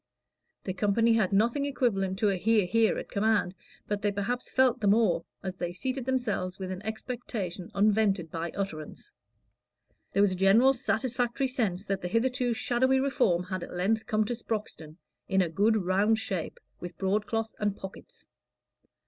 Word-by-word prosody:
The 185 - -3
company 210 +4 +2
had 215 -4 +2
nothing 230 +8 +2
equivalent 195 -9 0
to 210 +1 +2
a 195 - +1
"hear, 210 +2 +2
hear," 220 +5 +2
at - - -5
command, 205 -3 +1 0.3
but 205 -1 -2
they 205 - +1
perhaps 205 +5 -3
felt 260 -1 +3
the 205 - 0
more, 200 -5 +3 0.2
as 190 -1 -4
they 175 -1 -3
seated 260 +6 -3
themselves 215 -8 -1
with 190 -1 -5
an 185 0 -5
expectation 220 -5 -5
unvented 200 -4 +2
by 165 0 -3
utterance. 160 -6 -6 1.0
There 200 - +3
was 205 - +3
a - - -2
general 205 +8 +5
satisfactory 250 0 0
sense 210 -7 -1
that 195 0 -2
the 180 - -3
hitherto 245 +4 +1
shadowy 260 +3 +2
Reform 245 -10 +1
had 185 0 -4
at - - -8
length 215 +5 0
come 215 0 +1
to 240 - -2
Sproxton 210 -9 -5 0.3
in 190 - +1
a 170 - -2
good 210 +7 +2
round 200 +3 +2
shape, 220 - -4 0.2
with 175 -2 -8
broadcloth 215 +3 -1
and 205 -2 -1
pockets. 190 0 -11
210 Hz, 165 wpm, -28 LUFS, 190-235 Hz, 1.0 s, general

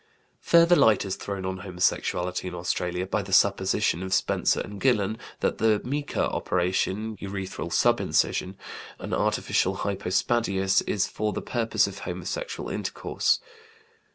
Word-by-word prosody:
Further 170 +1 +5
light 110 - +4
is 95 - -2
thrown 100 -2 -5
on 95 0 -3
homosexuality 90 -1 -1
in 90 - -5
Australia 90 +1 -2
by 105 +2 -1
the 95 0 -9
supposition 95 -2 +3
of 95 0 0
Spencer - - +1
and 100 0 -6
Gillen 110 -4 +2 0.2
that - - 0
the 110 -2 +3
mika 145 +3 -1
operation 95 +4 -1
(urethral 95 -3 -5
subincision), 95 +2 +2 0.4
an - - -6
artificial 95 +1 +1
hypospadias, 95 0 +1
is 100 - +1
for 105 0 -2
the - - -4
purpose 115 -2 +1
of - - -6
homosexual - - -5
intercourse. - - 0
95 Hz, 130 wpm, -26 LUFS, 95-110 Hz, 0.4 s, Further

